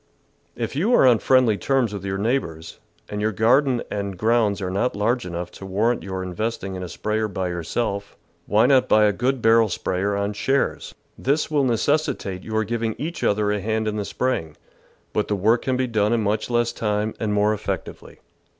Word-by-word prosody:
If -, -, -4 dB
you 210 Hz, -, +3 dB
are -, -, +5 dB
on 120 Hz, -4 st, +5 dB
friendly 125 Hz, -5 st, +3 dB
terms 130 Hz, -6 st, +1 dB
with 100 Hz, -, -6 dB
your 95 Hz, 0 st, -2 dB
neigh 115 Hz, +7 st, +2 dB
bours, 80 Hz, -8 st, -10 dB, 0.3 s
and 105 Hz, 0 st, -4 dB
your 110 Hz, +1 st, +1 dB
garden 125 Hz, +4 st, +3 dB
and 100 Hz, -2 st, -3 dB
grounds 110 Hz, 0 st, +2 dB
are 90 Hz, -2 st, -3 dB
not 100 Hz, +6 st, 0 dB
large 115 Hz, +2 st, 0 dB
enough 90 Hz, 0 st, -5 dB
to 95 Hz, -, -10 dB
warrant 110 Hz, +5 st, +1 dB
your 95 Hz, -1 st, -4 dB
investing 100 Hz, +2 st, -3 dB
in 95 Hz, -, -5 dB
a 90 Hz, -, -5 dB
sprayer 110 Hz, +5 st, -1 dB
by 95 Hz, -2 st, -3 dB
yourself, 100 Hz, +4 st, -3 dB, 0.3 s
why 110 Hz, +3 st, +4 dB
not 130 Hz, -1 st, +4 dB
buy 110 Hz, 0 st, +5 dB
a 105 Hz, -, +3 dB
good 130 Hz, +1 st, -1 dB
barrel 115 Hz, -1 st, +5 dB
sprayer 95 Hz, +2 st, -1 dB
on 100 Hz, +1 st, -1 dB
shares? 135 Hz, +6 st, -1 dB, 0.2 s
This 145 Hz, +4 st, 0 dB
will 145 Hz, -3 st, +2 dB
necessitate 120 Hz, -6 st, 0 dB
your 110 Hz, 0 st, -1 dB
giving 115 Hz, 0 st, -2 dB
each 165 Hz, +3 st, -5 dB
other 105 Hz, 0 st, +2 dB
a 105 Hz, -1 st, -1 dB
hand 110 Hz, +1 st, -1 dB
in 105 Hz, -, -1 dB
the 105 Hz, -, -1 dB
spraying, 85 Hz, -14 st, -2 dB, 0.6 s
but 105 Hz, -, 0 dB
the 105 Hz, -, 0 dB
work 110 Hz, +5 st, +2 dB
can 130 Hz, -1 st, -1 dB
be 130 Hz, -, +1 dB
done 110 Hz, -2 st, +1 dB
in 115 Hz, -2 st, +1 dB
much 105 Hz, +3 st, -1 dB
less 120 Hz, -1 st, +1 dB
time, 105 Hz, 0 st, -1 dB
and 110 Hz, -2 st, -1 dB
more 105 Hz, +1 st, +2 dB
effectively. 105 Hz, -, -6 dB
110 Hz, 200 wpm, -23 LUFS, 100-120 Hz, 0.6 s, are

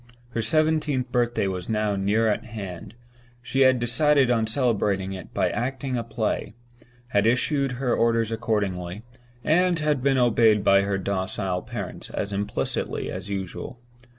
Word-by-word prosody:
Her 120 Hz, -1 st, -2 dB
seventeenth 150 Hz, -1 st, +1 dB
birthday 120 Hz, -4 st, +1 dB
was 90 Hz, -2 st, -3 dB
now 105 Hz, -2 st, 0 dB
near 105 Hz, +3 st, +1 dB
at 105 Hz, +1 st, 0 dB
hand; 105 Hz, -3 st, -8 dB, 0.4 s
she 120 Hz, +2 st, -3 dB
had 130 Hz, -2 st, +5 dB
decided 130 Hz, +2 st, +3 dB
on 115 Hz, -2 st, +2 dB
celebrating 105 Hz, -5 st, 0 dB
it 95 Hz, -, -9 dB
by -, -, 0 dB
acting 130 Hz, +3 st, -2 dB
a 120 Hz, -, -1 dB
play; 110 Hz, -1 st, -2 dB, 0.5 s
had 100 Hz, 0 st, +2 dB
issued 135 Hz, +3 st, +1 dB
her 125 Hz, -1 st, -1 dB
orders 115 Hz, -1 st, +2 dB
accordingly; 105 Hz, -4 st, -2 dB, 0.4 s
and 180 Hz, +2 st, +3 dB
had 150 Hz, -4 st, 0 dB
been 135 Hz, 0 st, +2 dB
obeyed 115 Hz, -4 st, +4 dB
by 100 Hz, 0 st, +5 dB
her 100 Hz, 0 st, -1 dB
docile 95 Hz, -1 st, -2 dB
parents 115 Hz, -6 st, -7 dB
as 100 Hz, -, -3 dB
implicitly 100 Hz, +1 st, -2 dB
as 100 Hz, -, -6 dB
usual. 100 Hz, +5 st, -5 dB
115 Hz, 150 wpm, -25 LUFS, 100-125 Hz, 0.5 s, had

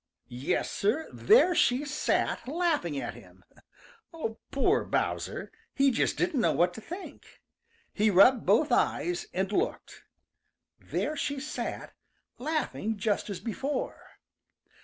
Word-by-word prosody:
Yes, 125 Hz, +3 st, -1 dB
Sir, 235 Hz, +11 st, 0 dB
there 420 Hz, -5 st, +5 dB
she 260 Hz, -2 st, +2 dB
sat, 295 Hz, -3 st, -1 dB
laughing 300 Hz, -, 0 dB
at -, -, -4 dB
him. -, -, -16 dB, 1.1 s
Poor 375 Hz, +10 st, +2 dB
Bowser! -, -, -2 dB, 0.2 s
He 275 Hz, 0 st, +4 dB
just 235 Hz, -, 0 dB
didn't 335 Hz, -8 st, +1 dB
know -, -, +3 dB
what 175 Hz, +1 st, +2 dB
to 225 Hz, -, -9 dB
think. 360 Hz, -, -10 dB, 0.5 s
He 215 Hz, +1 st, +2 dB
rubbed 210 Hz, +6 st, +6 dB
both -, -, +3 dB
eyes 350 Hz, 0 st, +1 dB
and 190 Hz, +2 st, -1 dB
looked. 415 Hz, -, -2 dB, 0.8 s
There 305 Hz, -, -2 dB
she 285 Hz, -1 st, -2 dB
sat, 300 Hz, +3 st, -5 dB, 0.5 s
laughing 255 Hz, -6 st, -2 dB
just 205 Hz, +1 st, -1 dB
as 200 Hz, -, -4 dB
before. 265 Hz, +5 st, -4 dB
270 Hz, 120 wpm, -29 LUFS, 210-315 Hz, 1.1 s, rubbed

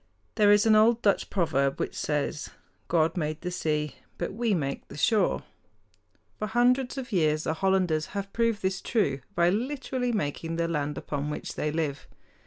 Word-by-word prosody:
There 205 Hz, -1 st, +5 dB
is 205 Hz, +1 st, +5 dB
an 220 Hz, -, +5 dB
old 225 Hz, +2 st, +4 dB
Dutch 200 Hz, -2 st, +2 dB
proverb 140 Hz, -7 st, +1 dB
which -, -, -2 dB
says, 150 Hz, 0 st, -2 dB, 0.4 s
"God 165 Hz, -1 st, +2 dB
made 155 Hz, -3 st, -2 dB
the 180 Hz, -, -3 dB
sea; 150 Hz, -4 st, -1 dB, 0.2 s
but -, -, -3 dB
we 225 Hz, -1 st, +1 dB
make 140 Hz, -4 st, -3 dB
the -, -, -10 dB
shore." 215 Hz, +7 st, +2 dB, 1.0 s
For 215 Hz, -, -2 dB
hundreds 245 Hz, +4 st, +2 dB
of 260 Hz, -2 st, -5 dB
years 155 Hz, -5 st, +2 dB
the 160 Hz, -, 0 dB
Hollanders 180 Hz, -3 st, +1 dB
have 200 Hz, 0 st, -4 dB
proved 230 Hz, -3 st, +1 dB
this 190 Hz, 0 st, -1 dB
true 145 Hz, -, 0 dB, 0.2 s
by 170 Hz, +1 st, +4 dB
literally 250 Hz, +2 st, -2 dB
making 165 Hz, -5 st, -2 dB
the 170 Hz, 0 st, 0 dB
land 150 Hz, -3 st, -2 dB
upon 145 Hz, 0 st, -3 dB
which 150 Hz, -, -5 dB
they 150 Hz, -, -2 dB
live. 150 Hz, -3 st, -2 dB
180 Hz, 175 wpm, -27 LUFS, 150-220 Hz, 1.0 s, There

